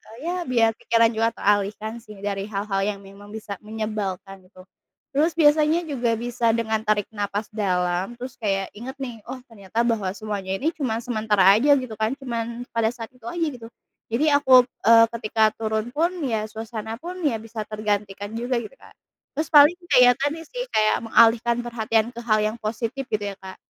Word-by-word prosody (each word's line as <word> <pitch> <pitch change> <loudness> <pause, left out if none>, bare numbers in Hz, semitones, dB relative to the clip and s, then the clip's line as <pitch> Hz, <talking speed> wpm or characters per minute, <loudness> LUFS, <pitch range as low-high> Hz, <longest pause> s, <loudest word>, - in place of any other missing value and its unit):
eee, - - -15
ya 360 - -2
biar 230 -3 +3
pikiran 230 0 +3
juga 225 0 +1
teralihkan 210 +3 0
sih, 215 -2 -13
dari 200 0 -3
hal-hal 200 -1 -2
yang 200 -1 -3
memang 200 +1 -14
bisa 205 -3 -7
menyebalkan, 205 -3 -5
gitu. 185 -1 -16 0.5
Terus 310 +4 +2
biasanya 310 +2 +4
juga 245 -7 -1
bisa 230 0 0
dengan 220 -1 0
tarik 210 -1 +1
napas 205 0 -3
dalam, 185 0 -1
terus 250 +1 -9
kayak 195 -3 -1
inget 255 +5 -7
nih, 245 -4 -5
"Oh, 260 - -7
ternyata 210 +1 -3
bahwa 225 -5 0
semuanya 200 -3 -4
ini 300 +11 0
cuma 240 -8 -2
sementara 215 -4 +1
aja", 285 +5 +5
gitu 255 -5 -4
kan. 220 +4 0
Cuman 235 -3 -4
pada 230 -1 +1
saat 230 -1 -8
itu 250 -3 -20
aja, 340 +7 -2 0.2
gitu. 225 - -10 0.4
Jadi 250 +7 +1
aku, 265 -3 +6 0.2
eee, 230 0 +8
ketika 220 0 +2
turun 220 +1 -2
pun, 335 +6 0
ya 220 -4 -1
suasana 220 0 -6
pun 360 +2 -7
ya 235 - 0
bisa 225 0 -6
tergantikan 205 -1 -3
juga 245 +2 -1
gitu, - - -9
Kak. - - -18 0.4
Terus 310 - 0
paling 295 +4 +8
kayak 250 -3 +6
tadi 290 +4 -1
sih, - - -6
kayak 215 - +2
mengalihkan 235 +1 +4
perhatian 225 -1 0
ke 235 - -9
hal 215 -2 +2
yang 215 +2 -1
positif 230 +4 -4
gitu 210 -5 -2
ya - - -14
Kak. 190 0 -10
225 Hz, 180 wpm, -23 LUFS, 210-250 Hz, 0.5 s, eee